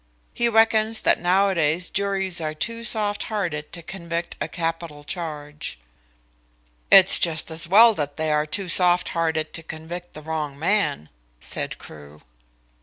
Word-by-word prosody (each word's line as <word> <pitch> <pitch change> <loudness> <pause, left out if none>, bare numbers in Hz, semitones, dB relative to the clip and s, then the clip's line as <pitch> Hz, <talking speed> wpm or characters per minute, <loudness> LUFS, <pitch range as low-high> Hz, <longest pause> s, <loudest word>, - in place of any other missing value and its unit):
He 235 0 0
reckons 225 0 +2
that - - +2
nowadays 180 -2 +1
juries 195 -3 -1
are 155 -1 -4
too 230 +8 -4
soft 210 -2 +2
hearted 175 -9 -4
to 170 - -7
convict 170 -1 -5
on - - 0
a - - -7
capital 165 -3 -5
charge." 150 - -6 1.1
"It's 195 0 +8
just 160 -1 -1
as 160 +1 -3
well 225 +5 +7
that 145 -6 -4
they 155 -1 -1
are 150 0 0
too 185 +5 -2
soft 180 0 +3
hearted 160 -2 -2
to 165 - -3
convict 165 +2 -9
the 155 - -8
wrong 150 -3 -4
man," 165 - 0 0.3
said - - -4
Crewe. 75 0 -14
170 Hz, 150 wpm, -23 LUFS, 155-195 Hz, 1.1 s, It's